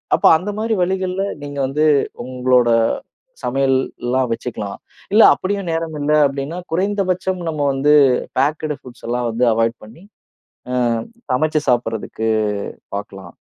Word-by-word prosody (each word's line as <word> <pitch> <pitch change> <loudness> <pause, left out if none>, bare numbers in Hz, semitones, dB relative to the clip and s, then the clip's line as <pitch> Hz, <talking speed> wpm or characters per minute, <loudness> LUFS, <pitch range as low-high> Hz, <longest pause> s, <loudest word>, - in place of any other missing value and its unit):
அப்ப - - -2
அந்த 185 +5 -6
மாரி 225 0 0
வழிகள்ல 185 +1 -1 0.2
நீங்க 145 -1 -6
வந்து 150 +3 +1 0.4
உங்களோட 125 -1 +2 0.7
சமையல்லாம் 130 -1 0
வச்சுக்கலாம். 105 -4 -5 0.3
இல்ல 220 - +7
அப்படியும் 195 -2 -3
நேரமில்ல, 155 -2 -1
அப்படீன்னா 140 +5 -5
குறைந்தபட்சம் 190 -1 0
நம்ம 155 -2 -3
வந்து 145 +3 +4 0.4
பேக்டு 150 +1 0
ஃபுட்ஸ் 125 -2 -13
எல்லாம் 120 -1 -1
வந்து 120 +2 +1
அவாயிட் 115 +1 0
பண்ணி, 120 - -15 0.7
அ 125 - +1 0.5
சமச்சு 155 +3 +1
சாப்பிடுறதுக்கு 110 -2 -1 0.7
பார்க்கலாம். 95 -3 -8
140 Hz, 115 wpm, -19 LUFS, 125-175 Hz, 0.7 s, இல்ல